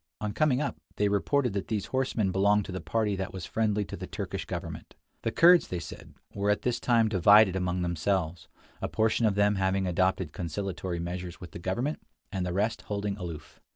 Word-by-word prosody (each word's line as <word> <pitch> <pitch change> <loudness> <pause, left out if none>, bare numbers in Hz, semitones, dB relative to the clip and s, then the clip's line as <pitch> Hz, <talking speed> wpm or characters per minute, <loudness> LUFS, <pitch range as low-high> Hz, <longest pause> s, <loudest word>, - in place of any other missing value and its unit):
On 105 -1 -3
coming 150 -5 +2
up, 140 - -3 0.2
they 105 0 +2
reported 125 +4 +1
that 100 - -3
these 105 -3 -1
horsemen 125 -7 +1
belonged 100 +2 +3
to - - -7
the 95 - -4
party 110 -3 0
that 95 0 -3
was 95 -2 -6
friendly 105 -2 0
to - - -7
the - - -7
Turkish - - -4
government. - - -6 0.3
The - - -1
Kurds, 175 +1 +6
they 90 - -3
said, 80 - -9 0.2
were 100 0 -1
at 105 - +1
this 125 -1 0
time 115 -2 +3
divided 100 0 +6
among 90 -1 -1
themselves, 85 -1 -1 0.3
a - - -1
portion 110 +1 +2
of 100 - +1
them 100 0 +3
having 95 0 +1
adopted 90 +1 0
conciliatory 90 +1 -3
measures 90 +1 -5
with 90 - -10
the - - -8
government, 120 - -2 0.3
and 95 - -2
the - - -2
rest 105 +5 0
holding 100 -1 -2
aloof. 85 -6 -8
100 Hz, 200 wpm, -28 LUFS, 90-110 Hz, 0.3 s, Kurds